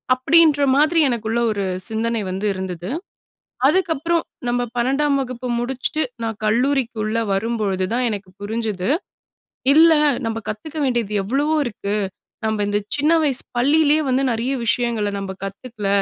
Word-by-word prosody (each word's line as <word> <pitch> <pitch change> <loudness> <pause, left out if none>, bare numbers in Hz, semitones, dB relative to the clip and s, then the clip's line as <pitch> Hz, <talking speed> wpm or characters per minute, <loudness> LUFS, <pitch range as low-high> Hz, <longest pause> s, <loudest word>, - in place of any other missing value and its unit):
அப்படின்ற 300 +3 +4
மாதிரி 310 +4 +4
எனக்குள்ள 230 -1 -1
ஒரு 200 -2 -2 0.2
சிந்தனை 225 0 -1
வந்து 190 +3 -3
இருந்தது, 185 -1 -5 0.8
அதுக்கப்புறம் 335 -1 +1 0.3
நம்ம 245 0 +1 0.2
12ம் 275 +4 +2
வகுப்பு 255 -1 -5
முடிச்சிட்டு, 265 +5 -1 0.2
நான் 225 -2 -3
கல்லூரிக்குள்ள 230 -2 0 0.2
வரும்பொழுது 195 -3 -1
தான் 250 0 +1
எனக்கு 200 -3 -6
புரிஞ்சுது, 215 -2 -2 0.9
இல்ல 325 +1 +7 0.3
நம்ம 225 0 -2
கத்துக்க 290 +9 -6
வேண்டியது 240 -5 -1
எவ்வளவோ 285 +8 +1
இருக்கு, 205 -3 -3 0.5
நம்ம 220 -1 0
இந்த 205 0 +1 0.2
சின்ன 300 +3 +3
வயசு 270 -4 +3
பள்ளியிலேயே 300 +4 +4
வந்து 260 +2 +2
நிறைய 235 +4 -1
விஷயங்களை 225 -2 0
நம்ப 190 -1 -5
கத்துக்கல, 205 +1 -5
235 Hz, 125 wpm, -21 LUFS, 210-280 Hz, 0.9 s, இல்ல